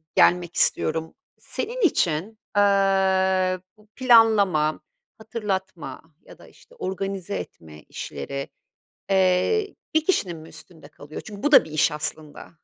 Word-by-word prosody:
gelmek 175 -1 +3
istiyorum. 160 0 +1 0.2
Senin 475 +2 -5
için, 205 - +1 0.2
aaa, 190 -2 +3 0.2
bu 215 0 -23
planlama, 215 -11 +4 0.4
hatırlatma 190 - -5 0.2
ya - - -16
da, - - -16
işte, - - -21
organize 195 - -4
etme 75 -1 -9
işleri, 140 - -6 0.6
eee, 190 - +2 0.2
bir 315 0 +3
kişinin 185 - 0
mi 160 +1 -12
üstünde 160 -1 -13
kalıyor? 150 0 -10
Çünkü 205 -2 -10
bu 295 - 0
da 270 - +8
bir 160 - -12
iş 155 0 +2
aslında. 150 0 -5
190 Hz, 125 wpm, -24 LUFS, 160-210 Hz, 0.6 s, da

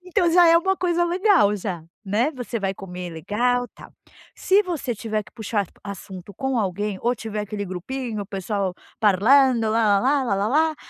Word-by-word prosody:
Então 365 -2 +1
já 350 0 +7
é 335 - +7
uma 380 +3 +1
coisa 345 -1 +1
legal, 355 - +3
já, 180 -5 -5 0.2
né. 220 +9 +1
Você 245 -3 -4
vai 195 -2 -1
comer 180 -2 -7
legal, 245 +10 0
tal. - - -14 0.4
Se 395 +2 +3
você 310 - -3
tiver 215 0 -3
que - - -19
puxar 210 -3 -2 0.2
a 200 - -6
assunto 190 0 -9
com 265 +3 -1
alguém 200 0 -2
ou 240 +1 +2
tiver 220 -2 -5
aquele 210 0 -4
grupinho 215 +5 -5
o - - -10
pessoal 195 -1 -3 0.3
parlando 230 +3 +4
lalala 225 +5 +3
lalala 255 +10 +1
220 Hz, 170 wpm, -23 LUFS, 200-275 Hz, 0.4 s, já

